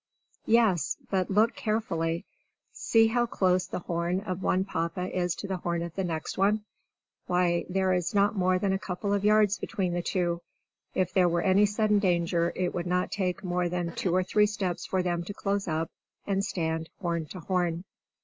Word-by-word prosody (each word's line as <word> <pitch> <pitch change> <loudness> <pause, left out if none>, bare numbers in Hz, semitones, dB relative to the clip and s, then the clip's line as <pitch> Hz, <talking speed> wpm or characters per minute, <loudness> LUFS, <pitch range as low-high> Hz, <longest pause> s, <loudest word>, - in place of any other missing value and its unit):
Yes, 220 -7 +3
but 185 -2 +1
look 215 +4 +3
carefully! 170 -7 -1 0.5
See 225 -1 +3
how 240 +2 +2
close 185 -4 +1
the - - -4
horn 170 +2 -1
of 185 -3 -4
one 190 0 +1
Papa 170 +1 -3
is 180 -1 0
to 200 - -6
the 190 -1 -2
horn 170 -1 -2
of 170 -1 -6
the 190 - -2
next 165 0 -3
one! 210 +2 +3 0.6
Why, 180 -1 +2
there 190 0 +1
is 180 +2 -1
not 205 +2 +3
more 185 -1 +2
than 190 +1 0
a 190 - 0
couple 200 +2 -3
of 200 -1 0
yards 210 -1 +4
between 185 -3 -2
the 175 - 0
two! 175 -1 -1 0.5
If 185 -1 0
there 180 -2 +4
were 170 0 0
any 195 +2 +4
sudden 210 0 +2
danger, 170 -2 +1
it 180 -1 -1
would 175 0 -3
not 180 +1 0
take 185 -1 -2
more 180 -1 0
than 175 -1 -2
two 180 -2 0
or 185 - +3
three 210 +3 +3
steps 190 -4 -3
for 185 -1 0
them 175 -1 -1
to 200 +3 -7
close 200 -1 -1
up, 160 0 -1 0.3
and 195 -1 0
stand 160 -4 -2
horn 170 -4 -2
to 185 - -8
horn. 175 -1 -1
185 Hz, 195 wpm, -28 LUFS, 175-200 Hz, 0.6 s, yards